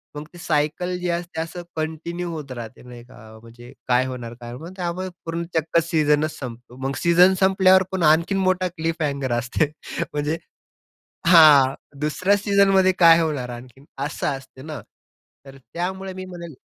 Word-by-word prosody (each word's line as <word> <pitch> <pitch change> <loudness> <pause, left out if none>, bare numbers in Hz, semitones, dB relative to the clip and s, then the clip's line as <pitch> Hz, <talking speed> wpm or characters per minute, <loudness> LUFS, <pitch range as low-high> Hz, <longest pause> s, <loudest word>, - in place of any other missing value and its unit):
मग 150 +1 -6
ते 175 - -12
सायकल 160 +3 -1
जी 180 - -3
असते 170 -1 -3
असं 165 +2 -6
कंटिन्यू 160 +3 -4
होत 150 -4 -7
राहते. 120 -2 -8
नाही 120 -1 -12
का. 110 -3 -15
म्हणजे 120 +2 -14 0.2
काय 125 +1 +3
होणार, 120 -3 -6
काय? 120 0 -8
मग 165 +6 -9
त्यामुळे 180 0 -3 0.2
पूर्ण 165 +1 -3
चक्क 160 +1 +2
सीझनच 155 -1 +1
संपतो. 120 -1 -9
मग 135 - -3
सीझन 175 +2 +6
संपल्यावर 190 -1 +5
पण 190 -2 -1
आणखीन 170 +5 +1
मोठा 185 0 +1
क्लिफ 165 -1 -4
हँगर 140 -4 -1
असते 130 +5 -1 0.4
म्हणजे 150 +2 -1 0.9
हां, 150 -6 +7 0.3
दुसऱ्या 185 +7 +1
सीझनमध्ये 195 -2 +3
काय 170 -1 +7
होणार 145 -6 -2
आणखीन 125 +3 -11 0.2
असं - - -4
असते 135 -1 -14
ना, 150 -4 -7 0.6
तर 135 -1 -13
त्यामुळे 190 +7 -5
मी 185 0 -7
म्हणेल 170 -3 -9
160 Hz, 160 wpm, -22 LUFS, 135-180 Hz, 0.9 s, हां